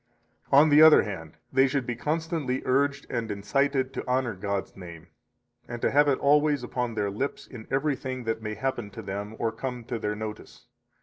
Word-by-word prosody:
70 135 - +3
On 155 +2 +6
the 150 +1 +7
other 155 -1 +8
hand, 80 -6 -7 0.2
they 135 +1 +5
should 135 -1 -1
be 120 - -3
constantly 155 -1 -2
urged 140 +2 +1
and 115 -3 -3
incited 130 +6 0
to - - -4
honor 125 -2 +1
God's 100 0 -4
name, 85 -3 -11 0.6
and 120 0 -6
to - - +1
have 145 +2 +4
it 135 -2 +3
always 145 -1 +3
upon 120 -1 -3
their 100 -2 -1
lips 130 +8 -4
in 115 -4 -11
everything 135 -2 -2
that 115 -1 -2
may 110 -1 -4
happen 120 -2 -3
to - - -9
them 100 +3 -5
or 115 - -1
come 125 0 -5
to 115 0 -4
their 105 0 -2
notice. 110 0 -8
125 Hz, 195 wpm, -27 LUFS, 110-140 Hz, 0.6 s, other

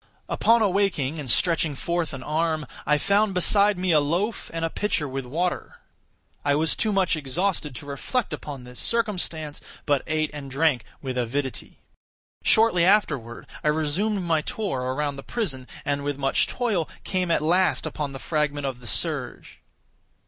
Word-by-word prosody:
Upon 230 0 +4
awaking, 180 -7 +1
and 140 -4 -5
stretching 160 +2 +3
forth 170 +3 -1
an 135 -3 -7
arm, 155 +1 0 0.2
I 150 0 +4
found 200 +3 +2
beside 200 +3 +4
me 180 0 +1
a 155 - +6
loaf 175 +10 -1
and 165 0 -2
a - - -1
pitcher 195 -8 0
with 135 -1 -4
water. 175 +7 -2 0.7
I 145 0 +3
was 160 +2 +2
too 215 - 0
much 190 -3 +2
exhausted 155 +1 -1
to 120 - -8
reflect 175 - -2
upon 140 -4 -6
this 125 0 -9
circumstance, 175 -10 -1 0.2
but 145 -2 +2
ate 155 -1 0
and 145 -2 -7
drank 140 -2 +2 0.2
with 130 -2 -2
avidity. 130 +2 -3 0.6
Shortly 220 -6 +5
afterward, 150 - +2 0.2
I - - 0
resumed 160 +7 +1
my 165 -3 +2
tour 210 - -3
around 140 +3 -2
the - - -6
prison, 135 - -3 0.2
and 140 0 -1
with 145 -1 -2
much 135 -1 +2
toil 210 -10 -1
came 185 -2 -1
at 165 - +2
last 180 +3 +3
upon 150 -2 -3
the 135 - -6
fragment 145 -1 -1
of 130 -2 -3
the 120 - -11
serge. - - -2
155 Hz, 165 wpm, -25 LUFS, 140-185 Hz, 0.7 s, a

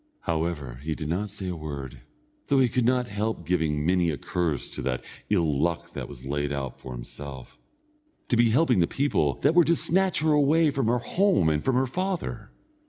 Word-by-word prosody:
However, 80 -7 -2
he 80 +1 -3
did 75 -2 -5
not 100 +5 -1
say 100 -1 -6
a 90 - -3
word, 70 -5 -7 0.5
though 140 - +3
he 130 -2 +4
could 125 0 +1
not 125 0 +2
help 105 +2 -3
giving 80 -4 0
many 90 -1 +3
a 75 - -2
curse 85 -6 -2
to - - -5
the 65 -1 -1 0.3
ill 80 -9 +2
luck 85 -1 -1
that - - -6
was 65 -2 -11
laid 70 +1 -1
out 70 -3 -4
for 65 - -8
himself, 65 +2 -9 0.7
to - - +3
be 120 0 +4
helping 125 - +3
the 85 - +3
people 80 - +1
that - - +4
were 175 0 +7
to 170 +1 +3
snatch 190 +2 +1
her 155 0 +3
away 150 +2 +4
from 135 -5 -1
her 120 +2 +3
home 175 - +2
and 75 -1 0
from 130 - +1
her 130 +1 +3
father. 130 - -3
90 Hz, 205 wpm, -26 LUFS, -, 0.7 s, were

